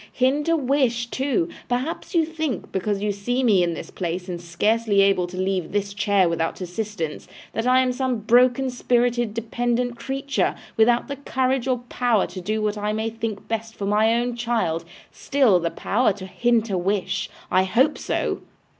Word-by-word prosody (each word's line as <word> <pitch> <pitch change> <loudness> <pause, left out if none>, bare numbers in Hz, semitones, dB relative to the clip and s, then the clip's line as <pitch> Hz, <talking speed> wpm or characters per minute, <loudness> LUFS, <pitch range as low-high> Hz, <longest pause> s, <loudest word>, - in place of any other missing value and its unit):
Hint 275 +5 +1
a 330 - +4
wish, 260 -4 +1
too! 260 -10 0 0.2
Perhaps 255 +9 -2
you 330 -2 +4
think, 315 - -4
because 200 +1 -1
you 210 - +1
see 245 +6 -1
me 210 -7 +4
in 170 -1 0
this - - -8
place 180 0 -4
and 175 -2 -5
scarcely 205 +4 +2
able 195 -2 +3
to 180 +1 -9
leave 185 -2 -1
this 200 -1 -1
chair 200 -3 +2
without 165 -1 -1
assistance, 180 -3 -4 0.3
that 225 +2 -1
I 255 +1 +5
am 255 -1 +1
some 255 -1 -1
broken 250 +3 +4
spirited 240 -2 +1
dependent 240 +1 -1
creature, 275 +1 -1 0.2
without 235 +2 +3
the 280 - -5
courage 265 -2 0
or 250 -2 0
power 240 -5 +2
to 185 - -8
do 215 +4 -1
what 210 0 -1
I 210 +1 -1
may 220 +1 -2
think 225 -2 -5
best 225 0 -3
for 200 - -4
my 215 +3 +3
own 240 0 -1
child. 225 -9 -1 0.3
Still 260 -10 +3
the 170 0 -1
power 210 +4 +1
to 190 -1 -9
hint 230 +2 +1
a 185 - +1
wish! 195 +2 -1 0.2
I 185 0 +4
hope 255 +10 +2
so! - - -2
225 Hz, 180 wpm, -23 LUFS, 195-250 Hz, 0.3 s, I